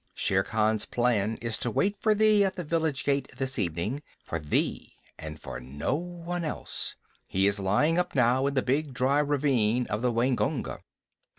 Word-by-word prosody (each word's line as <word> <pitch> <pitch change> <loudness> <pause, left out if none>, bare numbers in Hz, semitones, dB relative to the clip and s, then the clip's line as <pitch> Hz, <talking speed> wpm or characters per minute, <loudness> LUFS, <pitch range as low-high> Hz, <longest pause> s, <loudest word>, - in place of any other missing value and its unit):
Shere 95 0 +2
Khan's 110 +1 +1
plan 115 -3 +1
is 115 -2 0
to 120 - 0
wait 200 - +1
for 215 -1 +3
thee 215 -1 +5
at 190 -1 0
the 180 - -4
village 160 -4 0
gate 140 -1 +1
this 135 -2 -2
evening 90 - -2 0.2
for 85 - -3
thee 75 -1 -1 0.2
and 80 -1 -7
for - - -7
no 70 - -3
one 175 +2 -4
else. 155 - -3 0.3
He 95 +1 +1
is 100 0 +2
lying 125 - +2
up 180 - -2
now, 130 +1 +3
in 140 - -2
the 130 - +2
big 140 +1 0
dry 135 +3 +2
ravine 130 -5 +2
of 105 - -1
the 125 -1 +2
Waingunga." 120 +2 0
130 Hz, 180 wpm, -28 LUFS, 105-150 Hz, 0.3 s, thee